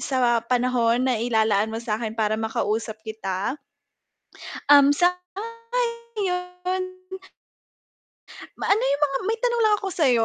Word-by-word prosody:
sa 245 -3 +2
panahon 245 -1 +2
na-ilalaan 220 -4 +2
mo 225 - -5
sakin 220 -1 -3
para 215 0 0
makausap 220 0 -2
kita. 220 +4 -3 1.1
Um, 285 0 +8 0.6
sang-ayon. 415 -7 -3 1.8
Ma - - -2
ano 405 - +5
yung 280 +2 0
mga 275 -2 +2
may 450 +1 0
tanong 475 -1 +1
lang 420 - +4
ako 390 - -2
sayo, 260 -9 +3
255 Hz, 110 wpm, -24 LUFS, 225-365 Hz, 1.8 s, Um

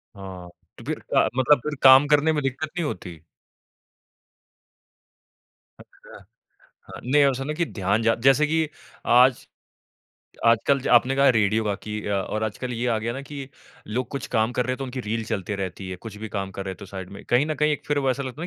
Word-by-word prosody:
हाँ, 95 -3 -9 0.3
तो - - -12
फिर - - -3 0.2
अ, - - +5
मतलब 130 +2 +4
फिर 150 0 -3
काम 135 +2 +8
करने 150 +2 +3
में 150 - 0
दिक्कत 135 +3 -2
नहीं 170 - 0
होती? 90 - -6 2.6
अच्छा। - - -16 0.7
हाँ - - -10
नहीं, 145 +4 +3
ऐसा 135 -1 +1
है - - -5
ना 150 - -2
कि 170 - 0
ध्यान 100 -1 -1
जा 115 0 +3
जैसे 135 +3 +5
कि 160 0 0 0.4
आज 125 +1 +4 1.0
आजकल 115 +4 +3
ज - - -4
आपने 125 +3 +4
कहा, 140 0 +5
रेडियो 110 -2 +2
बाकी 105 +1 -3
अ, 105 - -1
और 105 +2 -2
आजकल 125 +4 -4
ये 120 +1 -2
आ 115 -2 +1
गया 115 +2 -3
ना 135 - -5
कि 140 -1 -8 0.4
लोग 120 +4 -3
कुछ 140 - -4
काम 110 +2 +2
कर 125 0 -1
रहे, 130 0 -1
तो 135 - -5
उनकी 130 0 -5
रील 110 0 -3
चलते 105 -2 -3
रहती 95 0 -5
है। 90 - -5
कुछ 105 +2 -10
भी 110 +1 -7
काम 100 -2 -4
कर 100 - -3
रहे 95 - -4
हैं, - - -11
तो - - -10
साइड 95 -1 -8
में 100 - -11
कहीं 125 +5 +2
न 155 - -2
कहीं 150 0 +1
एक 150 - -4
फिर 145 -1 0
वो 135 -2 +1
ऐसा 140 +2 -2
लगता 130 +4 -7
है 175 - -3
125 Hz, 220 wpm, -24 LUFS, 105-140 Hz, 2.6 s, काम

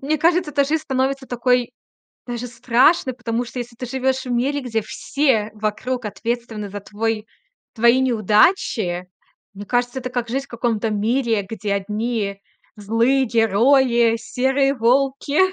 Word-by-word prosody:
Мне 295 +3 0
кажется, 335 -1 +2
то 280 -1 +3
жизнь 310 +3 -1
становится 265 -1 -1
такой 245 0 +1 0.5
даже 245 0 -5
страшной, 255 +4 +2
потому 240 0 -2
что 240 +2 -7
если 240 0 -7
ты 250 +2 -6
живёшь 265 +1 -1
в 250 - -4
мире, 275 +4 0
где 225 -3 -2
все 225 -1 0
вокруг 215 +4 -3
ответственны 225 -1 -4
за 205 +1 -6
твой 215 +2 -3 0.5
твои 235 +2 +4
неудачи, 215 - +2 0.5
мне 200 +1 -9
кажется, 245 +3 -1
это 255 - -5
как 245 -2 -3
жизнь 270 +3 -2
в - - -29
каком-то 230 -2 -1
мире, 225 +1 0
где 205 -2 -3
одни 210 0 -2 0.4
злые 230 +6 +2
герои, 235 +1 +3
серые 265 +4 +1
волки 275 +4 +1
240 Hz, 145 wpm, -21 LUFS, 220-265 Hz, 0.5 s, твои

